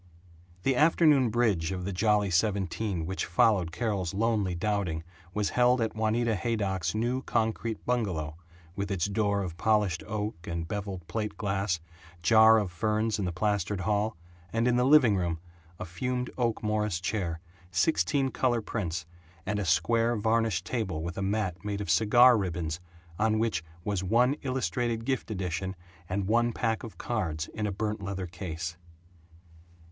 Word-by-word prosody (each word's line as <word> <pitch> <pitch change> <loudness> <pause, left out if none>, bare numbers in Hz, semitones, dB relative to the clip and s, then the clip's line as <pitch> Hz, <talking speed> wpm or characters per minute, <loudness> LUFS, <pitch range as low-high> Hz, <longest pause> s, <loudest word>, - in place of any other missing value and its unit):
The 135 - +2
afternoon 150 -3 +5
bridge 105 -8 +1
of 90 -1 -4
the 100 - -3
Jolly 105 +1 +2
Seventeen 95 -1 0
which 95 +3 -3
followed 90 -1 +3
Carol's 95 -2 -2
lonely 105 -4 +1
doubting 90 -4 -1 0.3
was 105 +1 0
held 125 +1 +4
at 110 -1 -1
Juanita 110 +1 +1
Haydock's 100 -3 -1
new 120 +4 0
concrete 115 -2 -1
bungalow, 90 -11 -1 0.4
with 100 -1 -3
its 95 -4 0
door 100 0 0
of 85 -3 -6
polished 105 -3 +2
oak 105 -5 -4
and 85 -1 -3
beveled 95 -3 -5
plate 105 +3 -3
glass, 95 -4 -1 0.4
jar 110 +4 +7
of 100 -5 -1
ferns 110 +4 0
in 100 - -1
the 90 - -1
plastered 100 +1 -1
hall, 105 0 0 0.3
and 115 +1 +1
in 125 - +3
the 125 0 +3
living 135 -7 +6
room, 85 -3 -1 0.4
a 95 - -5
fumed 125 +8 -3
oak 120 -4 -1
Morris 105 -4 0
chair, 90 -4 -2 0.3
sixteen 135 - +2
color 120 -2 +1
prints, 90 -7 -3 0.4
and 105 +2 -1
a 100 - -1
square 115 +8 +2
varnished 110 -3 +1
table 95 -10 -2
with 85 +1 -4
a - - -4
mat 95 -3 -1
made 100 -1 -3
of 100 -6 -1
cigar 115 +6 +6
ribbons 85 -4 -2 0.4
on 110 0 +2
which 110 -8 0 0.2
was 100 -2 -1
one 120 +7 +3
Illustrated 120 - -1
Gift 130 -2 -1
Edition 95 -1 -3 0.3
and 95 +1 -1
one 120 +2 +2
pack 110 -1 -1
of 115 - -9
cards 80 -10 -2
in 105 -1 -2
a - - -2
burnt 105 +1 -3
leather 95 -1 -4
case. 85 -2 -5
105 Hz, 160 wpm, -29 LUFS, 90-115 Hz, 0.4 s, jar